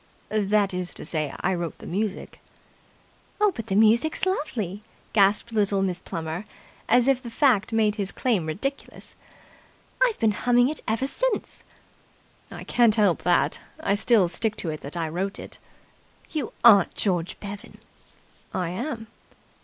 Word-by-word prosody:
"That 210 -2 +1
is 180 -1 -2
to - - -5
say, 155 -4 -2
I 190 - +1
wrote 170 -2 -4
the - - -12
music." 200 +2 -4 1.0
"But 390 - 0
the 190 - -1
music's 230 - +3
lovely," 230 - -2 0.3
gasped 205 +2 +3
little 200 -2 +1
Miss 180 -2 -1
Plummer, 165 +3 -5 0.4
as 245 0 +4
if 270 -2 +3
the 240 - -7
fact 230 -4 +2
made 215 -1 +2
his 200 -2 -3
claim 210 -11 0
ridiculous. 275 - -5 0.9
"I've 485 -3 +2
been 220 -1 +2
humming 245 +4 +3
it 310 - -5
ever 225 +4 0
since." - - -2 0.9
"I - - -8
can't 235 -3 +3
help 205 -6 +2
that. 175 -1 +2 0.2
I 200 - 0
still 205 -2 +4
stick 215 +5 0
to 165 - -3
it 155 - -7
that 145 +5 -8
I 165 -1 -1
wrote 185 +5 -3
it." - - -10 0.7
"You 295 -7 -3
aren't 205 -6 +6
George 180 -4 -1
Bevan!" 200 0 -9 0.8
"I 180 -3 -1
am!" 225 - -4
210 Hz, 150 wpm, -25 LUFS, 185-240 Hz, 1.0 s, aren't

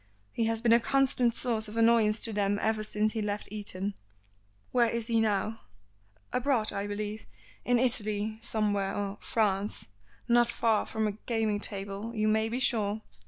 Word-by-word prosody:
He 230 - -1
has 225 +1 -1
been 230 -1 +5
a 235 - +6
constant 255 -2 +2
source 225 -3 0
of 210 +2 -8
annoyance 225 -2 +4
to 225 - +3
them 205 0 +1
ever 220 -1 0
since 215 0 0
he 220 - -2
left 205 0 -3
Eton." 205 -1 -4 0.8
"Where 240 -2 +3
is 230 0 -2
he 230 -1 +2
now?" 215 +1 0 0.7
"Abroad, 250 -4 +2
I 200 +1 -3
believe. 210 +1 -5 0.4
In 245 0 +3
Italy, 215 -3 0
somewhere, 205 -4 0
or 205 0 -3
France 205 - -1 0.4
not 240 0 +4
far 225 -2 +1
from 220 -1 -1
a 210 - +1 0.2
gaming 220 -3 0
table, 200 +3 -3
you 215 0 +1
may 220 +1 +2
be 235 - -2
sure. 220 -4 0
220 Hz, 165 wpm, -29 LUFS, 205-230 Hz, 0.8 s, a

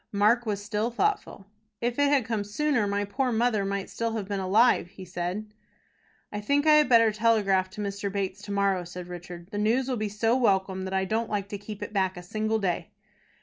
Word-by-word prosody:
Mark 215 +4 +3
was 205 -1 -2
still 210 +2 -1
thoughtful. 245 - -1 0.3
"If 240 +2 -2
it 285 0 +4
had 280 -5 +3
come 225 -3 -1
sooner, 230 +2 0
my 200 0 0
poor 250 +6 -1
mother 225 -2 +1
might 195 0 -2
still 230 -1 -3
have 215 -4 -3
been 200 -1 -2
alive," 205 +2 +3
he 185 +1 -11
said. 180 +4 -4 0.8
"I 210 - -4
think 285 +7 +1
I 310 - +7
had 300 -4 +4
better 230 -2 +6
telegraph 210 -4 +2
to 210 +3 -7
Mr. 200 0 -3
Bates 195 0 -3
to 205 - -6
morrow," 200 -2 +1
said 175 +1 -8
Richard. 175 0 -9
"The 205 - -3
news 235 +5 +2
will 255 -2 -1
be 215 -1 -2
so 225 +3 +1
welcome 190 -5 +1
that 190 - -5
I 190 0 +1
don't 220 +4 -1
like 200 -1 -2
to 205 - -4
keep 205 0 -7
it - - -7
back 190 -2 0
a 180 - -8
single 215 +4 -1
day." 190 -5 -2
205 Hz, 220 wpm, -27 LUFS, 195-230 Hz, 0.8 s, I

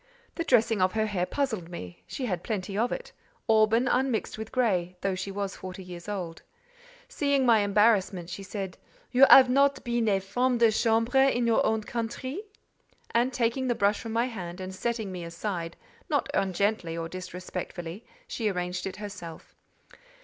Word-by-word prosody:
The 335 - -2
dressing 225 - +3
of 185 0 +3
her 220 0 +1
hair 185 -4 -1
puzzled 220 -12 -2
me; 90 - -8
she 260 - -4
had 180 -7 -2
plenty 200 -2 -3
of 230 +4 +1
it: - - -5 0.4
auburn, 225 +2 +4
unmixed 255 -2 0
with 220 0 -7
grey: 185 -8 +1
though 195 -1 0
she 185 +2 -4
was 195 0 -3
forty 185 +1 -8
years 175 +1 -9
old. 175 -5 -4 0.7
Seeing 280 -2 +1
my 230 -3 +6
embarrassment, 205 -3 +2
she 185 +3 -6
said, 195 -1 -6 0.3
"You 265 +2 +7
have 265 -1 +10
not 280 +2 +3
been 235 -1 0
a 195 -2 +3
femme 245 +6 0
de 230 -1 +5
chambre 230 +3 +2
in 245 -2 0
your 230 -1 +3
own 220 0 +1
country?" 240 - -4 0.7
And 240 +3 +2
taking 250 +1 0
the 240 - +1
brush 200 0 +2
from 225 - -6
my 230 +1 +2
hand, 185 -7 -6
and 185 0 -6
setting 220 0 -2
me 180 -2 -6
aside, 170 0 -4 0.3
not - - +1
ungently 190 -2 0
or 165 0 -3
disrespectfully, 180 +1 -6 0.2
she 230 - -1
arranged 180 -1 -3
it 190 - -6
herself. 185 -6 -9
210 Hz, 170 wpm, -28 LUFS, 185-235 Hz, 0.7 s, have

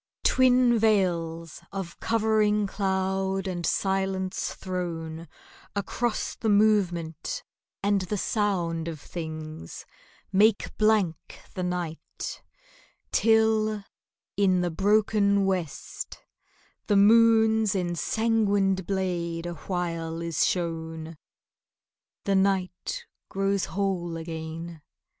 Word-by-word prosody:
Twin 250 -2 +4
veils 170 -6 0
of 190 -4 -6
covering 215 -2 +2
cloud 190 -1 -1
and 175 -2 -3
silence 190 -1 -1
thrown 165 -3 -4 0.5
Across 215 +3 -2
the 225 - -1
movement 185 -7 +1 0.4
and 200 -1 +2
the 195 +3 -2
sound 175 -6 0
of 160 -2 -5
things, 155 - -7 0.5
Make 205 +2 +3
blank 215 -6 +1
the 185 - -4
night, 180 -3 -4 0.7
till 220 -2 +3 0.5
in 185 -2 +3
the 175 -1 0
broken 200 +2 +3
west 180 -6 -3 0.7
The 205 - +4
moon's 220 0 +5
ensanguined 195 +1 +1
blade 175 -3 -2
awhile 165 -1 -3
is 170 -2 +1
shown.... 165 -2 -3 1.1
The 200 - +1
night 190 - 0 0.2
grows 195 -1 0
whole 185 -4 -2
again.... 165 0 -6
190 Hz, 90 wpm, -27 LUFS, 170-210 Hz, 1.1 s, moon's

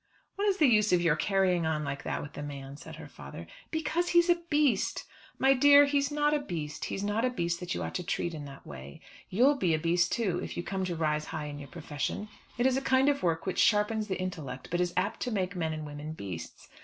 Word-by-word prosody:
"What 405 +1 0
is 395 -2 +2
the 310 - +5
use 215 -5 +4
of 180 -1 +4
your 165 -3 +4
carrying 180 -1 +2
on 155 -1 0
like 140 -1 -4
that - - -2
with 145 - -9
the - - -6
man?" 140 -1 -7
said 145 - -10
her - - -10
father. 70 +5 -10 0.2
"Because 320 +2 -1
he's 345 0 +5
a - - +5
beast." 290 -9 +2 0.3
"My 270 0 +5
dear, 285 +2 +7
he's 280 0 +1
not 295 0 +1
a 300 - +2
beast. 155 - -5
He's 195 - -3
not 205 +3 0
a 255 - +3
beast 170 -8 -2
that 180 -1 -3
you - - -3
ought - - -4
to 180 - -2
treat 170 0 -2
in 150 -2 -6
that 140 -1 -11
way. 70 0 -10 0.3
You'll 260 +9 +4
be 175 -10 +2
a - - 0
beast 170 +2 +2
too 195 -7 0
if - - -6
you 175 - -2
come 190 +1 -2
to 175 -2 -2
rise 150 -1 0
high 155 -2 -5
in 145 -1 -6
your 140 -2 -9
profession. 150 +11 -4 0.3
It 240 - +1
is 265 0 +3
a - - 0
kind 265 +1 +3
of 280 -1 0
work 165 -2 0
which 190 - -2
sharpens 210 0 +3
the 190 -2 -2
intellect, 160 -8 -5
but 175 +1 +1
is 175 -1 0
apt 200 +4 0
to 250 - -2
make 185 -3 -1
men 165 -3 -1
and 155 -1 -5
women 150 +1 -6
beasts. 90 - -8
180 Hz, 255 wpm, -30 LUFS, 150-255 Hz, 0.3 s, dear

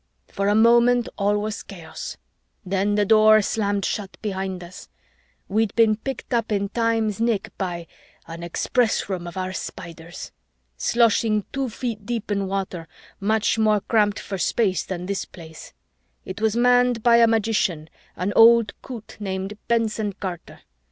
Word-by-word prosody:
"For 200 0 -2
a 205 - +3
moment, 235 +2 +5
all 205 +1 +1
was 210 0 -3
chaos. 165 -5 -8 0.5
Then 195 +2 0
the 205 0 +2
Door 215 0 +6
slammed 200 -2 -1
shut 200 -3 -4
behind 190 -3 -3
us. 175 +1 -12 0.6
We'd 215 +1 0
been 225 -2 +4
picked 255 +3 -6
up 230 -2 0
in 200 -1 0
time's 225 -2 0
nick 220 -3 -1
by 175 -3 -3 0.4
an 165 0 -8
Express 220 +7 0
Room 180 -3 -3
of 175 - -8
our 185 0 -3
Spiders! 170 -2 -8 0.4
sloshing 220 - +2
two 270 -2 -1
feet 230 -2 -5
deep 225 -1 -4
in 200 -1 0
water, 190 -3 -4 0.3
much 220 +2 +1
more 215 -2 +3
cramped 210 -2 +2
for 195 -2 -5
space 190 +2 +1
than 180 -1 -5
this 200 +1 -2
Place. 160 -2 -12 0.5
It 190 +3 -7
was 220 0 +1
manned 245 -1 +3
by 235 -1 +6
a 230 0 +6
magician, 215 -7 0 0.3
an 190 +3 -2
old 230 0 +6
coot 235 -5 -9
named 195 0 -4
Benson 220 -3 0
Carter. 185 -3 -7
210 Hz, 150 wpm, -23 LUFS, 190-225 Hz, 0.6 s, Door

